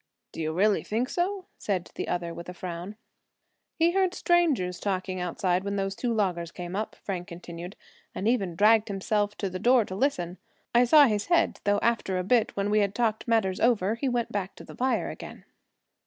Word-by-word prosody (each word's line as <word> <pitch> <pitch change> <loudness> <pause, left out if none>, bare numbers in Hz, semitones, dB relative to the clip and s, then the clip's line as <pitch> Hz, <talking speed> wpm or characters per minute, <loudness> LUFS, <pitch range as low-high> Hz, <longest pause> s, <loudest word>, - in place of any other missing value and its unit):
"Do - - -6
you 155 0 -1
really 200 +5 +2
think 235 +5 -2
so?" 370 +2 -1
said 190 -4 -2
the - - -4
other, 170 -1 -2
with 170 +1 -8
a 180 - -8
frown. 180 +3 -6 0.8
"He 330 +1 +3
heard 375 0 +1
strangers 285 - +2
talking 185 -2 -2
outside 180 +1 0
when 200 0 -2
those 195 0 -2
two 245 +2 -2
loggers 180 -6 -1
came 175 +1 -6
up," 215 +2 -3
Frank 180 -2 -4
continued, 175 0 -8 0.4
"and 200 - -2
even 200 -8 +1
dragged 215 +3 +5
himself 205 +1 -1
to 200 - -2
the 185 0 -5
door 245 +1 +4
to 185 - -7
listen. 185 -6 -1 0.3
I 240 +1 +6
saw 295 +4 +8
his 210 -5 0
head, 340 -1 +2
though 205 0 +3
after 225 -5 +1
a 180 - -1
bit, 225 +3 +2
when 200 +1 0
we 215 - +4
had 200 -1 0
talked 225 -1 0
matters 220 -5 +1
over, 220 -4 +2
he 260 +4 -1
went 240 -2 -1
back 195 -2 -3
to - - -11
the - - -12
fire 260 +1 0
again." - - -10
205 Hz, 200 wpm, -27 LUFS, 185-235 Hz, 0.8 s, saw